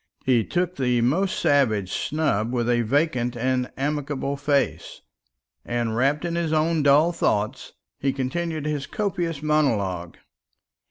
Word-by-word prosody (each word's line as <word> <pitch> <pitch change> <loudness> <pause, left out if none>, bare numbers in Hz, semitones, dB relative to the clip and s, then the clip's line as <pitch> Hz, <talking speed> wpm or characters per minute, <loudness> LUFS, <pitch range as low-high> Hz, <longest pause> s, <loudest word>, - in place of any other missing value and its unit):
He 125 -3 +3
took 180 - -2
the 125 -2 +1
most 175 +11 +1
savage 110 -10 +2
snub 130 -8 0
with 120 -2 -1
a 120 -1 +2
vacant 125 -1 0
and 125 +1 0
amicable 140 0 -2
face; 140 - -1 0.6
and, 120 -2 -2
wrapped 140 +6 +1
in 170 - -2
his 170 -2 -1
own 160 +1 +2
dull 145 +4 +5
thoughts, 110 -5 -1 0.3
he 135 - +1
continued 155 +4 -3
his 150 -2 -2
copious 175 -8 -2
monologue. 100 - 0
140 Hz, 130 wpm, -24 LUFS, 120-155 Hz, 0.6 s, dull